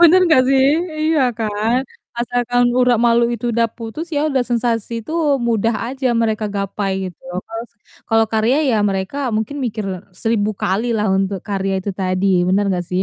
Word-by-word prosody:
Bener 345 +2 +7
gak 255 - +6
sih, 270 -1 +4 0.5
iya 305 -4 +3 0.2
kan? 220 +3 0 0.4
Asalkan 245 0 +1
urat 250 -2 +4
malu 235 0 +4
itu 235 +1 -3
udah 230 0 +2
putus, 230 +7 -6
ya 290 - +1
udah 270 -4 +1
sensasi 235 -1 -1
itu 230 - -8 0.4
mudah 230 0 +1
aja 265 +1 -3
mereka 220 -1 0
gapai 200 0 -2 0.2
gitu. 175 - -14
loh. 180 0 -4
Kalau 225 +1 -5 0.4
kalau 225 0 +3
karya 220 +4 +2
ya 235 - +2
mereka 195 +4 -2 0.2
mungkin 220 +7 -3
mikir 220 -3 -3 0.3
1000 215 +2 0
kali 220 +6 0
lah 210 0 0
untuk 195 0 0
karya 195 -1 -1
itu 200 - -3
tadi, 185 0 -1 0.2
bener 195 +2 +2
gak 175 - -3
sih? 180 +1 +1
225 Hz, 175 wpm, -19 LUFS, 200-245 Hz, 0.5 s, Bener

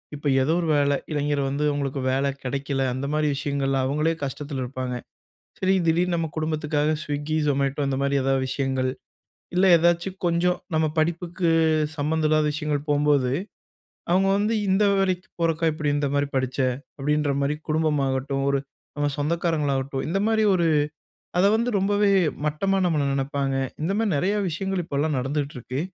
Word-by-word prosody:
இப்ப 145 0 -4 0.2
ஏதோ 155 +5 +1
ஒரு 165 - -2
வேல. 145 0 +3 0.2
இளைஞர் 145 -1 0
வந்து 140 +2 -2
உங்களுக்கு 140 -1 -2
வேல 135 +1 +1 0.2
கிடைக்கல, 135 +1 -2
அந்தமாரி 150 +4 0
விஷயங்கள்ல 140 -1 -1
அவுங்களே 150 +4 +1
கஷ்டத்துல 140 0 -4
இருப்பாங்க. 130 0 -4 0.7
சரி, 190 0 +3
திடீர்னு 170 +2 +2
நம்ம 165 -1 -1
குடும்பத்துக்காக 155 -1 0
ஸ்விகி, 145 +1 -2
ஜொமேட்டோ 140 0 0
அந்தமாரி 140 +1 0
எதா 135 +1 +2
விஷயங்கள், 130 -1 -1 0.7
இல்ல 185 +2 +4
ஏதாச்சும் 175 +3 +1
கொஞ்சம் 175 +1 +2 0.2
நம்ம 160 0 +2
படிப்புக்கு 170 +2 0 0.5
சம்மந்தம் 155 +1 +1
இல்லாத 155 0 +3
விஷயங்கள் 150 -2 -2
போகும்போது, 145 -3 +2 0.8
அவுங்க 190 +2 +3
வந்து, 210 +3 +1
"இந்த 190 +2 +3
வேலக்கிப் 190 0 0
போறக்கா, 165 0 +1
இப்பிடி 150 -1 -1
இந்தமாரி 145 0 0
படிச்ச?" 130 0 -1 0.4
அப்பிடின்றமாரி 145 0 0
குடும்பம் 155 -1 +1
ஆகட்டும், 135 +1 -1
ஒரு 140 - +2 0.4
நம்ம 145 0 +1
சொந்தக்காரங்களாகட்டும் 145 -4 -1
இந்தமாரி 215 +5 +1
ஒரு 170 -2 +2 0.7
அத 180 - +4
வந்து 235 +2 +1
ரொம்பவே 205 +1 +2 0.4
மட்டமா 195 +6 0
நம்மள 160 -5 +1
நெனப்பாங்க. 135 0 -1 0.3
இந்தமாரி 200 +7 0
நெறையா 190 +9 +1
விஷயங்கள் 190 +3 -2
இப்பல்லாம் 150 -1 -1
நடந்துட்டுருக்கு. 135 -1 -3
150 Hz, 135 wpm, -24 LUFS, 140-170 Hz, 0.8 s, இல்ல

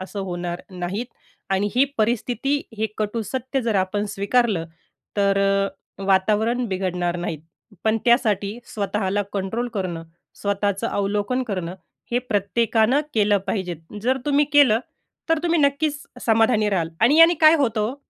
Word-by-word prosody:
असं 195 +2 -6
होणार 175 -1 -4
नाहीत 185 +6 -4 0.4
आणि 195 +2 +1
ही 260 +2 +5
परिस्थिती 240 +5 0 0.2
हे 220 - +1
कटू 215 +2 -1
सत्य 260 +5 -3
जर 225 -2 0
आपण 205 +2 -1
स्वीकारलं, 200 -4 +1 0.5
तर 200 -1 +2
अ, 195 0 -1
वातावरण 215 +5 +2
बिघडणार 180 -2 -1
नाहीत. 165 -3 -4 0.4
पण 220 0 +2
त्यासाठी 215 -3 +2 0.2
स्वतःला 205 -1 -1
कंट्रोल 225 +5 -2
करणं, 175 -4 -3 0.4
स्वतःचं 200 -1 0
अवलोकन 205 +5 -1
करणं, 185 -5 -4 0.4
हे 245 - +3
प्रत्येकानं 225 +3 +1
केलं 205 -2 +3
पाहिजेत. 180 -4 -2 0.3
जर 255 +3 +2
तुम्ही 290 0 +3
केलं, 260 -6 +5 0.5
तर 325 - +3
तुम्ही 340 -1 +2
नक्कीच 285 +1 +1 0.2
समाधानी 220 -1 +3
राहाल. 170 -4 0
आणि 270 +8 +5
याने 335 +1 +8
काय 310 +1 +8
होतं 230 -7 +1
हो? 255 - -5
210 Hz, 140 wpm, -22 LUFS, 195-245 Hz, 0.5 s, याने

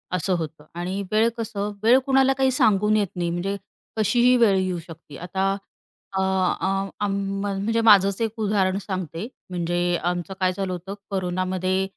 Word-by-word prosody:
असं 185 +2 0
होतं 155 -1 -6 0.2
आणि 185 +3 -2
वेळ 220 +2 +4
कसं? 210 -2 -3
वेळ 235 +3 +7
कुणाला 270 0 +4
काही 265 -1 +3
सांगून 215 -5 +3
येत 205 -2 +1
नाही, 175 -1 -1
म्हणजे 175 +4 -2 0.4
कशीही 240 +4 +4
वेळ 210 -5 +4
येऊ 185 -2 -1
शकते. 155 -3 -11
आता 190 +2 -1 0.6
अ, - - +2
अ, 190 0 +1 0.4
आम 200 - -1
म 195 0 -2 0.2
म्हणजे 225 +1 +1
माझंच 200 -1 +6
एक 225 0 -2
उदाहरण 200 -3 +1
सांगते. 185 +1 -4 0.2
म्हणजे 175 -1 -1 0.3
आमचं 180 +2 -3
काय 185 -1 +2
झालं 195 -1 -2
होतं? 180 +3 -6 0.2
कोरोनामध्ये 185 0 -1
195 Hz, 160 wpm, -24 LUFS, 185-215 Hz, 0.6 s, वेळ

